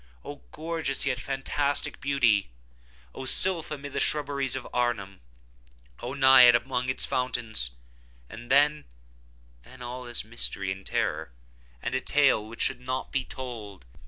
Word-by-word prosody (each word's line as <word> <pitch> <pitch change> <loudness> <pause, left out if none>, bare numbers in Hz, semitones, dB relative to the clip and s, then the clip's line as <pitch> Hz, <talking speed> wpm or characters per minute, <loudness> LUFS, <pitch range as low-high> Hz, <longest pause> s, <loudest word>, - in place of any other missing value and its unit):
Oh, - - -8
gorgeous 160 -3 -1
yet 130 -3 -1
fantastic 140 +3 -2
beauty! 125 - +2 0.6
Oh, 130 - -7
sylph 170 +4 +4
amid 145 -2 -7
the - - -1
shrubberies 140 -3 +1
of - - -5
Arnheim! 115 -6 -2 0.8
Oh, 125 +3 -5
Naiad 130 -3 +8
among 125 +1 -1
its 130 - +1
fountains! 115 - -2 0.6
And 120 - -11
then—then - - -2
all 125 +1 -7
is 120 -3 -2
mystery 100 -4 -2
and 95 0 -6
terror, 90 - -2 0.5
and - - -3
a - - 0
tale 140 -6 +3
which 110 +2 -4
should - - -1
not 130 +1 -4
be 135 - 0
told. 110 - -8
125 Hz, 135 wpm, -27 LUFS, 105-140 Hz, 0.8 s, Naiad